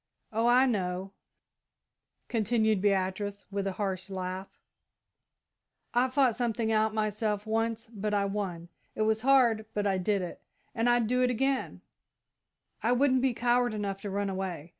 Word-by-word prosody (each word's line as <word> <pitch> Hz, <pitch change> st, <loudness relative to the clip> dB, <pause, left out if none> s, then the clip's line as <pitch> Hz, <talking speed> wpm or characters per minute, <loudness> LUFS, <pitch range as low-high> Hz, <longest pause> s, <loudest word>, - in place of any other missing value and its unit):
Oh, 225 Hz, +2 st, +2 dB
I 250 Hz, +2 st, +6 dB
know," 190 Hz, -5 st, -1 dB, 1.2 s
continued 220 Hz, -2 st, +1 dB
Beatrice, 200 Hz, 0 st, 0 dB
with 200 Hz, 0 st, -2 dB
a 195 Hz, -, -2 dB
harsh 190 Hz, -1 st, -3 dB
laugh; 185 Hz, 0 st, -5 dB, 1.4 s
"I 245 Hz, +1 st, +3 dB
fought 260 Hz, -3 st, +3 dB
something 230 Hz, -2 st, -1 dB
out 215 Hz, 0 st, +2 dB
myself 215 Hz, -1 st, -1 dB
once, 225 Hz, +1 st, -1 dB
but 210 Hz, 0 st, -2 dB
I 200 Hz, -1 st, +2 dB
won. 190 Hz, -4 st, -4 dB, 0.3 s
It 215 Hz, -, 0 dB
was 220 Hz, 0 st, +1 dB
hard, 240 Hz, -5 st, +4 dB
but 205 Hz, 0 st, 0 dB
I 195 Hz, -2 st, +1 dB
did 195 Hz, +1 st, 0 dB
it, 175 Hz, -, -7 dB, 0.3 s
and 230 Hz, +1 st, +1 dB
I'd 240 Hz, -1 st, +3 dB
do 250 Hz, +3 st, +1 dB
it 250 Hz, -, +3 dB
again 270 Hz, +2 st, -1 dB, 1.0 s
I 235 Hz, +2 st, +2 dB
wouldn't 260 Hz, 0 st, +3 dB
be 260 Hz, -2 st, +1 dB
coward 240 Hz, -1 st, +2 dB
enough 200 Hz, -2 st, -3 dB
to 205 Hz, -, -5 dB
run 200 Hz, +1 st, -1 dB
away. 185 Hz, -4 st, -4 dB
215 Hz, 155 wpm, -29 LUFS, 195-240 Hz, 1.4 s, I